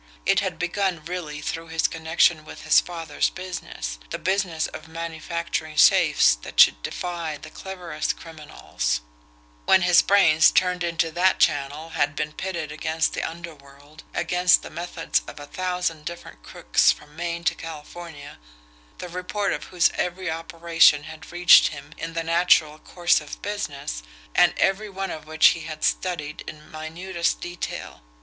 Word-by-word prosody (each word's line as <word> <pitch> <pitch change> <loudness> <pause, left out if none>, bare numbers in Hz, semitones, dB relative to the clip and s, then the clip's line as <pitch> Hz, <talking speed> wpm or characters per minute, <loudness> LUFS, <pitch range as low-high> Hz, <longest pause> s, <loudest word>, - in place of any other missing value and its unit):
It - - +4
had - - -3
begun 175 -3 -2
really 160 -4 -5
through 165 +1 -4
his 160 0 +1
connection 160 0 +1
with - - -11
his 155 - +6
father's 165 -4 -2
business 175 - -6
the - - -3
business 185 -4 0
of - - -8
manufacturing 165 -1 -4
safes - - +5
that - - -8
should - - +7
defy 170 - -4
the 155 - -12
cleverest 180 -2 -4
criminals 150 - -4 0.6
when 185 - +5
his 175 -1 +6
brains, 165 -6 +5
turned 180 -1 +1
into 165 -1 0
that 180 +3 +2
channel, 145 +3 0
had 145 -2 0
been 150 0 -3
pitted 170 -5 -4
against 160 +1 -1
the - - -3
underworld, 155 -3 -10
against 180 0 +3
the - - -9
methods 170 0 -2
of - - -9
a 145 - -8
thousand 180 -2 -3
different 170 - -8
crooks - - +2
from - - -10
Maine 170 0 -4
to - - +2
California, 160 - -10 0.6
the 180 - -7
report 180 +3 -2
of - - -5
whose 180 -2 +2
every 180 -1 -2
operation 165 -2 +3
had 155 +1 -11
reached 175 0 +7
him 145 0 -9
in 165 0 -5
the 165 0 -2
natural 165 -2 +3
course 175 -1 +1
of 150 - -9
business, 140 - -4 0.3
and - - +4
every 200 +2 +1
one 195 0 -4
of 155 -1 -8
which 155 0 +6
he 165 - -2
had 155 -1 -8
studied 155 -5 -1
in 150 0 -10
minutest 170 +3 -3
detail. 175 - -6
165 Hz, 155 wpm, -24 LUFS, 155-175 Hz, 0.6 s, should